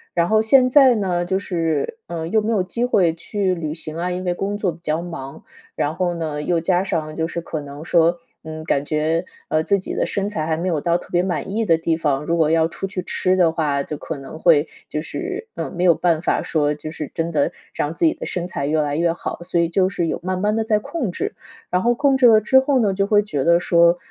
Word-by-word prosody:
然 170 0 +2
后 215 0 +3
现 255 +3 +5
在 260 -3 +6
呢， 180 -4 0
就 190 +2 -1
是， 170 - -2
呃， 165 -1 -4
又 220 +4 +2
没 220 +2 -1
有 205 -4 +2
机 235 +6 -3
会 185 -9 +3
去 185 +2 -2
旅 155 -2 -4
行 160 -1 -6
啊， 175 +2 -2
因 180 +1 -4
为 175 - +1
工 200 +3 -3
作 200 -3 0
比 165 - -13
较 155 +1 -1
忙。 160 -6 -8 0.3
然 150 +2 -1
后 180 -1 0
呢， 155 -3 -3
又 170 0 +1
加 180 +2 +1
上 155 -5 -3
就 160 - -1
是 170 +1 -4
可 160 -2 -5
能 145 +2 -9
说， 170 0 +3 0.3
嗯， 155 0 -7
感 140 -3 +1
觉， 155 +3 0 0.2
呃， 155 0 +1
自 200 +2 +2
己 - - -6
的 - - +1
身 200 0 -2
材 160 -7 -3
还 160 0 0
没 180 +3 -2
有 160 -5 0
到 170 0 +2
特 - - -12
别 175 0 +1
满 180 +1 -3
意 225 +1 0
的 165 -5 +3
地 165 0 0
方， 150 -3 -1
如 170 - 0
果 160 -1 +2
要 165 0 +3
出 195 - -6
去 190 -1 -4
吃 185 +1 +1
的 165 -3 +3
话， 145 -4 0
就 150 - -5
可 155 +1 -6
能 135 +3 -9
会 160 -3 +4 0.2
就 150 - -2
是， 380 - -5
嗯， - - -4
没 180 +1 -1
有 170 - +6
办 165 -3 +1
法 - - 0
说， 150 -2 +1
就 155 +1 -7
是 155 -3 -6
真 165 0 -2
的 145 -3 +1 0.2
让 150 +2 -2
自 - - -3
己 320 - +5
的 - - -7
身 175 -1 -3
材 155 -6 -4
越 155 0 +2
来 145 0 -1
越 170 0 +2
好， - - -5
所 175 -1 0
以 170 - +1
就 185 +2 +2
是 175 -3 -2
有 - - -2
慢 185 +1 -2
慢 210 +1 +1
地 225 0 0
在 215 -2 +2
控 245 - -3
制。 - - -3 0.4
然 180 +1 +1
后 240 +1 +3
控 275 0 +3
制 255 - +4
了 220 -2 +7
之 265 +5 +5
后 265 -1 +2
呢， 205 -4 +2
就 195 +1 0
会 210 -1 +4
觉 145 -9 -2
得 170 0 +5
说： 170 0 +4
170 Hz, 280 characters per minute, -21 LUFS, 160-195 Hz, 0.4 s, 了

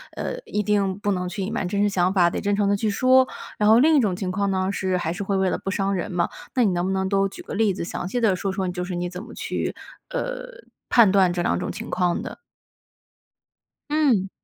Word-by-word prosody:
呃， - - -4
一 210 - -1
定 200 -1 0
不 205 0 0
能 180 0 -2
去 195 +2 -5
隐 195 +4 -3
瞒 205 -5 -2
真 200 +2 -1
实 205 - +3
想 185 -1 +1
法， 175 -3 +4
得 - - -3
真 200 0 0
诚 200 -1 +1
地 205 - +3
去 215 +1 0
说。 255 +4 +4 0.3
然 210 - +2
后 225 +2 +7
另 310 +3 +5
一 - - +6
种 200 -7 +1
情 185 -1 -3
况 200 +1 0
呢 190 +1 0
是 185 -2 -1
还 165 -2 -2
是 200 +3 -4
会 195 0 -1
为 190 -1 +2
了 - - -1
不 195 - -4
伤 195 0 0
人 180 - -3
嘛。 175 -1 0 0.2
那 250 -2 +3
你 200 - +3
能 175 +1 0
不 190 - -1
能 190 0 0
都 195 -1 +2
举 195 - -10
个 - - -7
例 210 -3 +2
子， 180 - -4
详 175 - -4
细 245 +5 -2
地 205 -5 +3
说 195 +1 -2
说 190 -1 -2
就 180 0 -3
是 180 - -5
你 175 0 -2
怎 180 +1 -7
么 - - -11
去， - - -3 0.4
呃， - - -3 0.4
判 220 -6 +6
断 190 -3 +4
这 175 - -1
2 - - +1
种 - - -3
情 - - -7
况 180 -1 0
的？ - - -8 1.5
嗯。 260 -11 +2
195 Hz, 275 characters per minute, -23 LUFS, 185-210 Hz, 1.5 s, 后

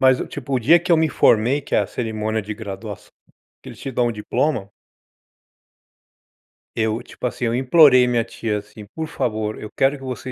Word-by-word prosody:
Mas 130 -1 +5
eu, - - -4
tipo, 135 - -7
o - - +3
dia 165 +9 +5
que 180 +2 -6
eu 170 - +6
me 160 0 +2
formei, 125 +1 +3
que - - -1
a - - +2
cerimônia 110 -1 -3
de 105 +2 -5
graduaç 105 -1 -8 0.6
que - - -10
eles - - -12
te 135 - -5
dão 120 -1 +1
o 120 - -1
diploma 110 +1 -1 2.1
eu, 110 +1 0
tipo 120 - -9
assim, 125 0 -2
eu 115 0 0
implorei 130 -1 +6
minha 120 -2 +1
tia, 115 -2 -3
assim: 105 +1 -13
"Por 160 +10 -6
favor, 110 -7 -3
eu 105 - -8
quero 135 +2 +2
que 135 - -14
você 130 0 -6
120 Hz, 200 wpm, -21 LUFS, 110-135 Hz, 2.1 s, eu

